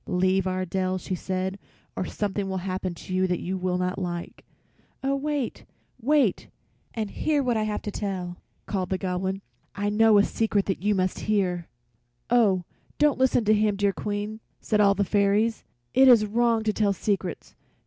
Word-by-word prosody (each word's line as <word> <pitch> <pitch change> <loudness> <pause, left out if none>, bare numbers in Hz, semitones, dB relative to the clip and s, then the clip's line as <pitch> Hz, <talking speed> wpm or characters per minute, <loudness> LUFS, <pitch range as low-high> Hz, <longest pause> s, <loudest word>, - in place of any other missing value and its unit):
"Leave 185 +1 +2
our 185 0 -1
dell," 185 +1 -1
she 185 - -5
said, 185 +2 -3 0.4
"or 185 - -2
something 200 0 -2
will 190 - -2
happen 185 -1 -3
to 185 - -8
you 185 0 +2
that 180 -1 -1
you 185 +2 -3
will 180 -1 -1
not 180 +1 -1
like." 175 -2 -5 0.6
"Oh, 275 +1 +1
wait, 285 -2 -2 0.4
wait 265 -5 +2 0.5
and 215 -3 -3
hear 295 -2 0
what 245 -2 +1
I 220 - +1
have 210 -1 -3
to 210 - -4
tell!" 185 -4 -4 0.3
called 185 -3 -2
the 190 - 0
Goblin. 190 +1 -2 0.3
"I 205 0 -1
know 220 0 +5
a 200 - +6
secret 205 -4 0
you 205 +1 +2
must 185 -1 0
hear." 180 -5 +1 0.6
"Oh, 205 -7 +4 0.3
don't 295 -3 +3
listen 255 -3 +3
to 215 - +5
him, 210 -1 +2
dear 200 0 +1
Queen!" 205 +2 -4 0.2
said 210 -1 +1
all 200 -1 +5
the 205 - -1
little 200 - -2
fairies. 205 +2 +2 0.3
"It 265 +1 +6
is 235 -4 +7
wrong 230 +1 +2
to 215 -1 +1
tell 205 -2 +2
secrets. 195 -2 -3
200 Hz, 180 wpm, -26 LUFS, 185-220 Hz, 0.6 s, is